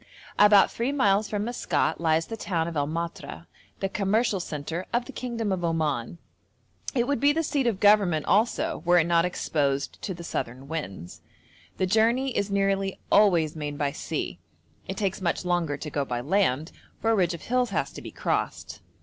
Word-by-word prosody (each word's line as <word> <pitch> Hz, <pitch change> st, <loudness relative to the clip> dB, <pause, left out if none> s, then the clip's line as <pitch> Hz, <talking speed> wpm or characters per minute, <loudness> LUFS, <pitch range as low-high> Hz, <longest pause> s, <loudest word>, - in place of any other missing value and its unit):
About 205 Hz, -1 st, +7 dB
three 240 Hz, +4 st, -1 dB
miles 205 Hz, -6 st, +2 dB
from 210 Hz, 0 st, -2 dB
Maskat 170 Hz, -10 st, -1 dB
lies 160 Hz, 0 st, +2 dB
the 225 Hz, -, -6 dB
town 170 Hz, -6 st, -2 dB
of 170 Hz, -, -5 dB
El 145 Hz, -1 st, 0 dB
Matra, 170 Hz, +1 st, -5 dB, 0.4 s
the 195 Hz, -, +1 dB
commercial 205 Hz, +2 st, +1 dB
centre 165 Hz, +2 st, -5 dB
of 240 Hz, +1 st, 0 dB
the -, -, -9 dB
kingdom 230 Hz, -4 st, -3 dB
of 185 Hz, -2 st, -1 dB
Oman. 155 Hz, -5 st, -1 dB, 0.8 s
It 240 Hz, -2 st, +2 dB
would 285 Hz, -3 st, 0 dB
be 285 Hz, +3 st, +5 dB
the 325 Hz, +2 st, 0 dB
seat 280 Hz, -4 st, 0 dB
of 215 Hz, -5 st, 0 dB
government 200 Hz, -7 st, +4 dB
also 215 Hz, -3 st, +1 dB
were 175 Hz, 0 st, +4 dB
it 165 Hz, -, +4 dB
not 170 Hz, 0 st, +3 dB
exposed 140 Hz, -5 st, -1 dB
to 190 Hz, -, -4 dB
the 170 Hz, -, -9 dB
southern 130 Hz, -3 st, -4 dB
winds. 95 Hz, -, -6 dB, 0.6 s
The 185 Hz, -, +1 dB
journey 230 Hz, +6 st, +2 dB
is 200 Hz, 0 st, 0 dB
nearly 195 Hz, -1 st, 0 dB
always 175 Hz, -7 st, +4 dB
made 145 Hz, -2 st, -4 dB
by 145 Hz, -1 st, 0 dB
sea; 150 Hz, -, -4 dB, 0.5 s
it 190 Hz, -, -5 dB
takes 195 Hz, -1 st, -1 dB
much 175 Hz, 0 st, -1 dB
longer 175 Hz, -5 st, 0 dB
to 150 Hz, -, -6 dB
go 145 Hz, -, 0 dB
by 125 Hz, -3 st, -3 dB
land, 155 Hz, 0 st, +1 dB, 0.3 s
for 225 Hz, -, +1 dB
a -, -, +4 dB
ridge 180 Hz, -3 st, +1 dB
of 170 Hz, -, -11 dB
hills 250 Hz, 0 st, +1 dB
has -, -, -1 dB
to -, -, -9 dB
be -, -, -8 dB
crossed. -, -, -3 dB
180 Hz, 190 wpm, -26 LUFS, 155-210 Hz, 0.8 s, About